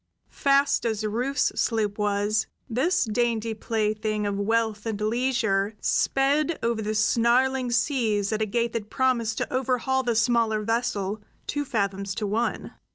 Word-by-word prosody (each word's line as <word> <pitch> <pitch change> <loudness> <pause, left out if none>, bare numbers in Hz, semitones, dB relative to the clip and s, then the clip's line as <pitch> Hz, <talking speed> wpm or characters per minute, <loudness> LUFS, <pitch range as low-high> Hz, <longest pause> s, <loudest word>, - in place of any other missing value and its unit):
Fast 280 0 +2
as 220 -2 -1
Rufe's 250 +7 0
sloop 215 -3 0
was, 205 +1 +1 0.2
this 265 +8 +1
dainty 230 0 0
plaything 215 -1 -1
of 200 -1 -1
wealth 220 0 0
and 215 -2 -3
leisure 220 -3 0
sped 285 +4 +1
over 230 -1 0
the 215 0 -2
snarling 245 +4 +2
seas 225 -5 +1
at 215 - -1
a 215 - +1
gait 235 +2 -1
that 215 -2 -4
promised 235 -4 0
to - - -3
overhaul 260 0 +1
the 240 -3 -1
smaller 230 -2 +2
vessel 215 -3 -1 0.2
two 290 0 -2
fathoms 200 -6 -2
to 215 - -2
one. 220 +4 -2
225 Hz, 145 wpm, -25 LUFS, 210-250 Hz, 0.2 s, Fast